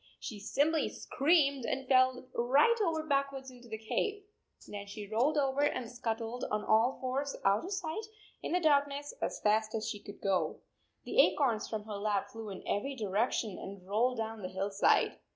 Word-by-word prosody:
She 215 Hz, -6 st, -6 dB
simply 295 Hz, +9 st, +1 dB
screamed 280 Hz, -3 st, +2 dB
and 265 Hz, +2 st, -2 dB
fell 255 Hz, -1 st, +4 dB
right 275 Hz, -, +4 dB
over 325 Hz, -4 st, 0 dB
backwards 275 Hz, -3 st, -1 dB
into 245 Hz, -1 st, -14 dB
the 220 Hz, -1 st, -5 dB
cave. 410 Hz, -, -2 dB, 0.4 s
Then 205 Hz, -1 st, -7 dB
she 205 Hz, +1 st, -7 dB
rolled 250 Hz, +9 st, +1 dB
over 275 Hz, -1 st, +1 dB
and 255 Hz, -5 st, 0 dB
scuttled 235 Hz, 0 st, -3 dB
on 210 Hz, 0 st, -1 dB
all 225 Hz, +4 st, +3 dB
fours 270 Hz, +2 st, -2 dB
out 200 Hz, +2 st, +3 dB
of 380 Hz, -, -6 dB
sight 385 Hz, +2 st, -3 dB, 0.3 s
in -, -, -4 dB
the 360 Hz, -, +3 dB
darkness 285 Hz, -2 st, +2 dB
as -, -, -2 dB
fast 215 Hz, +1 st, +2 dB
as 220 Hz, -, -2 dB
she 210 Hz, -, -4 dB
could 200 Hz, 0 st, -11 dB
go. 195 Hz, -2 st, 0 dB, 0.4 s
The -, -, +5 dB
acorns 240 Hz, -, +2 dB
from 215 Hz, -2 st, -3 dB
her 210 Hz, -1 st, -6 dB
lap 205 Hz, -1 st, -1 dB
flew 225 Hz, -2 st, -7 dB
in 195 Hz, -, -8 dB
every 270 Hz, +7 st, -1 dB
direction 215 Hz, -1 st, -1 dB
and 190 Hz, -1 st, -9 dB
rolled 235 Hz, +5 st, +1 dB
down 225 Hz, -1 st, -4 dB
the 185 Hz, -, -4 dB
hillside. 195 Hz, +1 st, +2 dB
240 Hz, 180 wpm, -32 LUFS, 210-280 Hz, 0.4 s, The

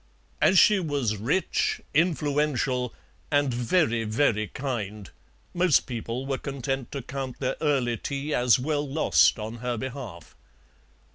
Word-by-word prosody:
As 190 Hz, -, +5 dB
she 210 Hz, +2 st, +6 dB
was 140 Hz, -, -1 dB
rich, 135 Hz, -, 0 dB
influential, 145 Hz, -5 st, +1 dB, 0.4 s
and 145 Hz, -3 st, +2 dB
very, 120 Hz, -1 st, +1 dB
very 110 Hz, -1 st, +1 dB
kind, 105 Hz, -6 st, -5 dB, 0.4 s
most 175 Hz, -3 st, +4 dB
people 120 Hz, +1 st, -4 dB
were 135 Hz, -1 st, -2 dB
content 135 Hz, -2 st, -4 dB
to 140 Hz, -3 st, -4 dB
count 135 Hz, 0 st, -6 dB
their 130 Hz, -1 st, -1 dB
early 130 Hz, -6 st, +1 dB
tea 140 Hz, +5 st, -4 dB
as 120 Hz, -3 st, +4 dB
well 145 Hz, +2 st, -1 dB
lost 100 Hz, -, +4 dB
on 110 Hz, +2 st, -6 dB
her 120 Hz, 0 st, -3 dB
behalf. 125 Hz, -, -7 dB
130 Hz, 130 wpm, -26 LUFS, 115-145 Hz, 0.4 s, she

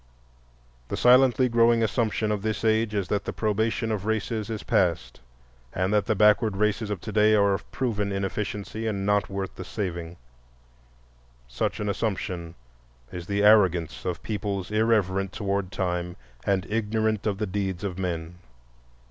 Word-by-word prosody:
The -, -, -4 dB
silently 125 Hz, 0 st, +5 dB
growing 115 Hz, -1 st, +4 dB
assumption 110 Hz, -1 st, 0 dB
of 105 Hz, -2 st, -1 dB
this 110 Hz, +1 st, -2 dB
age 110 Hz, -1 st, +2 dB
is 100 Hz, -3 st, -1 dB
that 100 Hz, -, -1 dB
the -, -, -2 dB
probation 110 Hz, +1 st, -1 dB
of 105 Hz, -1 st, -3 dB
races 110 Hz, 0 st, -1 dB
is 110 Hz, -2 st, -4 dB
past, 85 Hz, -3 st, 0 dB, 0.5 s
and 95 Hz, +3 st, 0 dB
that 105 Hz, -1 st, +2 dB
the 110 Hz, -, +2 dB
backward 105 Hz, 0 st, +4 dB
races 105 Hz, +1 st, 0 dB
of 105 Hz, -3 st, -3 dB
to 110 Hz, -, -6 dB
day 110 Hz, 0 st, +4 dB
are 100 Hz, -1 st, +4 dB
of 95 Hz, -, -5 dB
proven 105 Hz, -6 st, -1 dB
inefficiency 105 Hz, +2 st, -3 dB
and 100 Hz, -3 st, -2 dB
not 105 Hz, 0 st, +1 dB
worth 95 Hz, -1 st, -4 dB
the 95 Hz, -, -8 dB
saving. 85 Hz, -3 st, -5 dB, 1.3 s
Such -, -, -2 dB
an 105 Hz, -, -2 dB
assumption 95 Hz, -5 st, -3 dB, 0.6 s
is 90 Hz, -1 st, -7 dB
the 100 Hz, 0 st, 0 dB
arrogance 95 Hz, -6 st, +4 dB
of 90 Hz, -2 st, -4 dB
peoples 100 Hz, -3 st, -3 dB
irreverent 100 Hz, -4 st, +1 dB
toward 100 Hz, -2 st, -2 dB
Time 90 Hz, -3 st, -2 dB, 0.3 s
and 95 Hz, -3 st, +1 dB
ignorant 110 Hz, 0 st, 0 dB
of 100 Hz, -2 st, 0 dB
the 105 Hz, -, -1 dB
deeds 95 Hz, -2 st, -3 dB
of 95 Hz, -2 st, -4 dB
men. 85 Hz, -1 st, -4 dB
105 Hz, 155 wpm, -26 LUFS, 95-110 Hz, 1.3 s, silently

